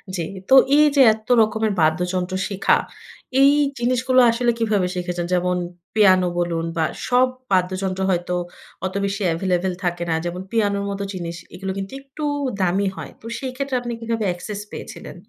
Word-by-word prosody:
জি। 175 - -2 0.3
তো - - +5 0.2
এই 300 - +6
যে 275 - +6
এ্যাত্ত 220 0 +2
রকমের 220 0 +1
বাদ্যযন্ত্র 180 +3 0
শিখা। 195 -1 +2 0.6
এই 280 +1 +7 0.3
জিনিসগুলো 255 +1 +2
আসলে 240 +1 +1
কীভাবে 210 -5 +1
শিখেছেন? 175 -1 -3
যেমন, 180 0 +1 0.4
পিয়ানো 185 -4 +5
বলুন 165 -1 -1
বা 160 - +2 0.2
সব 250 +1 +4 0.2
বাদ্যযন্ত্র 185 +1 0
হয়তো 180 0 0 0.5
অত 190 - -3
বেশি 200 +1 -3
এভেইলেবল 180 +1 0
থাকে 175 -1 -1
না। 160 - +2
যেমন 175 +2 -4
পিয়ানোর 200 -3 +1
মতো 200 0 -3
জিনিস। 170 -2 -5 0.2
এগুলো 190 +1 -4
কিন্তু 195 +6 -5
একটু 275 +3 -9 0.4
দামি 190 +2 +1
হয়। - - -8
তো - - -16
সেই 260 -2 -4
ক্ষেত্রে 275 -1 -2
আপনি 240 -1 -5
কীভাবে 230 -1 -2
অ্যাক্সেস 200 +4 -4
পেয়েছিলেন - - -8
195 Hz, 160 wpm, -22 LUFS, 180-225 Hz, 0.6 s, এই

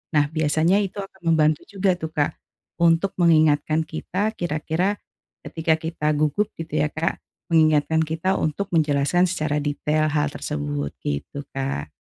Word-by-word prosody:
Nah, 145 0 +3
biasanya 160 +4 +2
itu 200 0 -3
akan 190 -1 -14
membantu 155 -1 +2
juga 195 -1 +1
tuh, 160 0 -5
Kak, 145 -1 +1 0.5
untuk 170 +3 +3
mengingatkan 155 -2 +3
kita, 185 +7 -2
kira-kira 175 +4 -1 0.5
ketika 160 -1 0
kita 160 -1 -4
gugup 155 +8 +1
gitu 160 -2 -3
ya, 150 - +2
Kak, 160 +2 -2 0.3
mengingatkan 160 -1 +4
kita 160 +4 0
untuk 190 +6 -2
menjelaskan 155 +2 +2
secara 155 -4 -1
detail 150 +1 0
hal 150 -1 +1
tersebut, 75 - -3
gitu, 75 - -4
Kak. 135 - -3
155 Hz, 140 wpm, -23 LUFS, 150-170 Hz, 0.5 s, mengingatkan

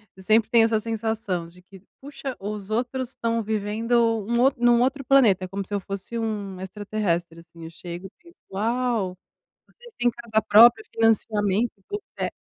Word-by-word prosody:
eu 190 - -14
sempre 220 +3 +2
tenho 230 -1 +6
essa 220 -1 +1
sensação 220 -6 -3
de 180 +2 -17
que 190 -1 -16 0.2
puxa 275 -1 -7
os 205 0 -6
outros 250 +3 -2
estão 230 -3 -2
vivendo 215 +2 -2 0.3
um 235 0 +1
out 270 +1 +4
num 240 0 +4
outro 275 +1 -1
planeta 225 -9 +4
como 195 +1 -5
se 205 - -9
eu 200 - +1
fosse 195 +5 -6
um 200 -4 -4
extraterrestre, 190 -4 -3
assim, 170 0 -15
eu 165 - -8
chego 175 +3 -8
e 190 - -10
penso: 340 0 -19 0.2
"Uau, 225 -3 -1 0.5
vocês 480 -1 -17
têm 245 0 +3
casa 230 -2 -1
própria, 235 - +7
financiamento, 220 -1 +1
hipoteca". 410 - -6
215 Hz, 170 wpm, -24 LUFS, 195-235 Hz, 0.5 s, própria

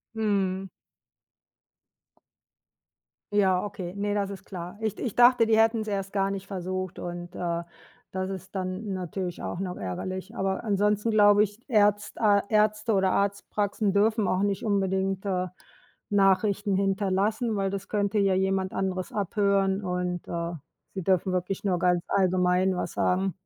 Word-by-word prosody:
Mhm. 195 -3 0 2.6
Ja, 190 -3 +3
okay, 185 -3 -6
ne, 205 0 -1
das 200 -1 -1
ist 195 0 -8
klar. 180 0 -8
Ich 220 -2 -2
ich 235 - -4
dachte, 245 -1 +6
die 220 - +3
hätten's 225 -1 +3
erst 195 -1 -3
gar 195 -1 +1
nicht 195 0 -5
versucht 185 -1 -4
und, 175 0 -6
äh, 170 -1 -2 0.5
das 185 +1 -3
ist 190 +1 -8
dann 190 +2 -3
natürlich 180 0 -4
auch 175 - -4
noch 180 -2 -4
ärgerlich. 185 - -5
Aber 190 0 -1
ansonsten 210 +1 +1
glaube 205 -1 +6
ich, 210 +2 -5
Ärzt 210 -2 +2
A 205 -2 +5
Ärzte 215 0 +2
oder 190 -1 +3
Arzt 200 0 0
Praxen 205 -1 0
dürfen 215 0 +2
auch 185 - +1
nicht 200 +1 -1
unbedingt, 195 -1 0
äh, 185 -1 0 0.6
Nachrichten 200 0 +2
hinterlassen, 200 +3 0
weil 195 -1 0
das 195 0 -5
könnte 205 0 0
ja 195 -2 +3
jemand 190 0 0
anderes 185 -1 -2
abhören 200 -1 +1
und, 180 -1 -3
äh, 170 0 -3 0.4
sie 190 - -3
dürfen 185 0 +2
wirklich 185 +1 -2
nur 190 -3 +1
ganz 180 0 +2
allgemein 185 0 +2
was 180 - -3
sagen. 190 +1 +1
195 Hz, 150 wpm, -27 LUFS, 185-205 Hz, 2.6 s, dachte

